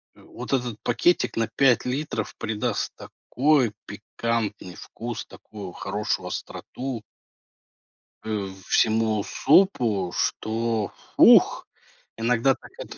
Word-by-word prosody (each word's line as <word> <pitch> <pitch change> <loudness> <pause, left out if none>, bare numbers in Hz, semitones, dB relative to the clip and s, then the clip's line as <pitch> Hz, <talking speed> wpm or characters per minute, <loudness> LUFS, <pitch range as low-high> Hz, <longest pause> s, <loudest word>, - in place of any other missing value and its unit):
вот 125 +3 -8
этот 120 -4 -1
пакетик 175 +8 +1
на 115 -1 +1
5 125 +1 +3
литров 125 -4 -3
придаст 110 -1 -2
такой 135 -4 0
пикантный 110 -6 -4
вкус, 115 0 -7
такую 100 -4 -10
хорошую 100 +3 -3
остроту 125 -3 -6 1.2
э, 105 -3 -3 0.2
всему 110 -1 +2
супу, 120 - +2
что 110 -1 -1 0.3
"Ух." - - +6 0.5
Иногда 120 +3 +2
так - - -14
это - - -9
115 Hz, 95 wpm, -25 LUFS, 105-125 Hz, 1.2 s, Ух